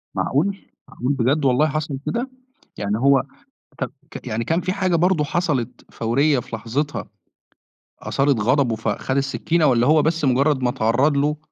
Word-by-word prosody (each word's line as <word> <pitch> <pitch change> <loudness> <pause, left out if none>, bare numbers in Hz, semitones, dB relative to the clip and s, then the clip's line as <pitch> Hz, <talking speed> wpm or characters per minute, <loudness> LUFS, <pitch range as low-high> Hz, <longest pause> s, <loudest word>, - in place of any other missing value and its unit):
معقول؟! 195 +9 0 0.3
معقول 130 +4 -2
بجد 135 +3 +1
والله 135 +4 +3
حصل 155 -2 -3
كده؟! 245 +3 -2 0.5
يعني 100 +1 -1
هو 135 0 +4 0.6
طَب - - -3 0.2
ك - - -9
يعني 115 +2 -2
كان 165 +2 0
في 185 +1 -2
حاجة 185 -3 +1
برضه 175 -2 +2
حصلت 145 -7 -2
فوريّة 135 +5 +1
في 115 - -7
لحظتها 140 +7 -3 0.9
أثارت 135 -4 +1
غضبه 125 +1 +2
فخَد 115 +5 -2
السِّكِّينة 155 +4 0
والّا 125 -2 +3
هو 155 0 +5
بس 160 -1 0
مُجرّد 135 +1 +2
ما 125 - +2
اتعرّض 130 +6 +1
له، 150 +2 +1
140 Hz, 155 wpm, -21 LUFS, 125-155 Hz, 0.9 s, هو